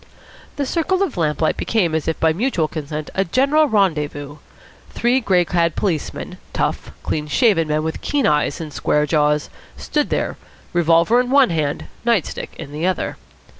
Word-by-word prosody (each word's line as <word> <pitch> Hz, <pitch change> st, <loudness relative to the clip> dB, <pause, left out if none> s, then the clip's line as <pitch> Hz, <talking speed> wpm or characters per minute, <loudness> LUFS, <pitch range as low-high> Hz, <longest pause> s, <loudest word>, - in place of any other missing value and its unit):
The 285 Hz, -1 st, -1 dB
circle 360 Hz, +6 st, +1 dB
of 350 Hz, -9 st, -3 dB
lamplight 155 Hz, -2 st, 0 dB
became 185 Hz, -8 st, 0 dB
as 160 Hz, -1 st, -1 dB
if 160 Hz, -, -1 dB
by 160 Hz, -1 st, +3 dB
mutual 185 Hz, -5 st, 0 dB
consent 155 Hz, -1 st, -5 dB
a 195 Hz, -, +1 dB
general 275 Hz, -, +3 dB
rendezvous. 150 Hz, -, 0 dB, 0.5 s
Three 245 Hz, +2 st, +1 dB
grey 185 Hz, -7 st, +2 dB
clad 170 Hz, -1 st, +1 dB
policemen, 175 Hz, -8 st, -3 dB
tough, -, -, -2 dB
clean 150 Hz, -1 st, -2 dB
shaven 195 Hz, -, +3 dB
men 155 Hz, 0 st, 0 dB
with 160 Hz, 0 st, -3 dB
keen 290 Hz, -2 st, 0 dB
eyes 150 Hz, -1 st, +1 dB
and 155 Hz, -3 st, -7 dB
square 150 Hz, 0 st, +1 dB
jaws, 150 Hz, -1 st, +1 dB, 0.3 s
stood 295 Hz, -1 st, -1 dB
there, -, -, -1 dB, 0.4 s
revolver 170 Hz, +6 st, +4 dB
in 250 Hz, 0 st, 0 dB
one 270 Hz, -5 st, +5 dB
hand, 155 Hz, -1 st, -1 dB, 0.2 s
night 230 Hz, -7 st, +2 dB
stick -, -, -7 dB
in 150 Hz, -4 st, -8 dB
the 155 Hz, +4 st, -1 dB
other. 185 Hz, -, -2 dB
170 Hz, 170 wpm, -20 LUFS, 155-235 Hz, 0.5 s, one